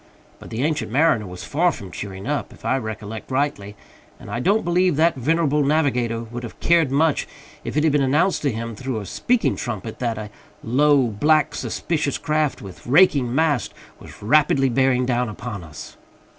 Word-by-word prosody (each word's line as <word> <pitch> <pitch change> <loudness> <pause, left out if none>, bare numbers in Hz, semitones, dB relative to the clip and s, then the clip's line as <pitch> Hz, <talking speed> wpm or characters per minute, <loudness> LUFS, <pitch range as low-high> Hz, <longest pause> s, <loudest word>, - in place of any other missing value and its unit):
But - - -11
the 115 +4 -3
Ancient 150 -6 -1
Mariner 130 -6 +2
was 90 0 -8
far 170 +4 +1
from 95 - -9
cheering 95 -1 -7
up, 145 0 -2
if - - -15
I - - +2
recollect 110 -1 -7
rightly; 130 -7 -2 0.4
and 105 - -10
I 115 - -2
don't 200 - +2
believe 175 -1 +2
that 165 +3 +3
venerable 150 +2 +1
navigator 125 -6 +1
would 120 +1 -7
have 120 - -9
cared 165 -4 +3
much 150 +3 +1 0.4
if - - -4
it 150 - +3
had 160 - +3
been 145 0 +2
announced 150 +8 +2
to 140 - +1
him, 115 0 -5
through 130 0 -4
a 100 - -7
speaking 245 - 0
trumpet, 110 -2 -5
that 115 -3 -2
"a 105 -1 -7 0.3
low, 140 +3 +3
black, 145 +7 +2
suspicious 150 -4 -2
craft, 155 -5 -1
with 95 +2 -11
raking 135 -4 +4
masts, 150 -7 +1 0.2
was - - -13
rapidly 135 +2 +3
bearing 125 0 +2
down 125 -1 0
upon 105 -3 -7
us!" 75 -2 -11
130 Hz, 185 wpm, -22 LUFS, 115-150 Hz, 0.4 s, raking